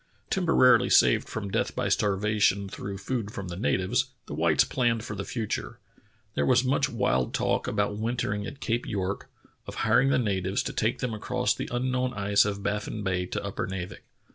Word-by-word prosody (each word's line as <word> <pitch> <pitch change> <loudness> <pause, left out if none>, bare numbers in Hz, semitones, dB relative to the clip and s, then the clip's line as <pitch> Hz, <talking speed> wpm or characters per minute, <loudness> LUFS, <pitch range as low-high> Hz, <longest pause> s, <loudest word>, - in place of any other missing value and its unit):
Temporarily 165 -9 +4
saved - - +4
from 100 -3 -4
death - - -1
by - - -1
starvation 100 -1 +1
through 95 +1 -6
food 105 +1 -3
from 95 -3 -6
the 85 - -5
natives, 95 -1 +1 0.2
the - - -7
whites - - +3
planned 115 -3 0
for 105 - -5
the 100 - -4
future. 110 0 -4 0.6
There 70 - 0
was 100 - +4
much 135 +1 +1
wild 65 - 0
talk - - 0
about 105 0 -1
wintering 110 -3 -2
at 140 - -9
Cape 120 -3 -1
York, 100 -1 -3 0.4
of - - -7
hiring 135 - +4
the - - +3
natives 95 -4 0
to - - -4
take 115 +3 0
them 125 -3 -1
across 125 +3 0
the - - -5
un 125 +1 -1
known 125 0 -1
ice 100 0 +3
of 100 -1 -3
Baffin 105 +1 -2
Bay 90 -2 -1
to - - -3
Upernavik. 95 -2 -4
105 Hz, 185 wpm, -27 LUFS, 95-120 Hz, 0.6 s, Temporarily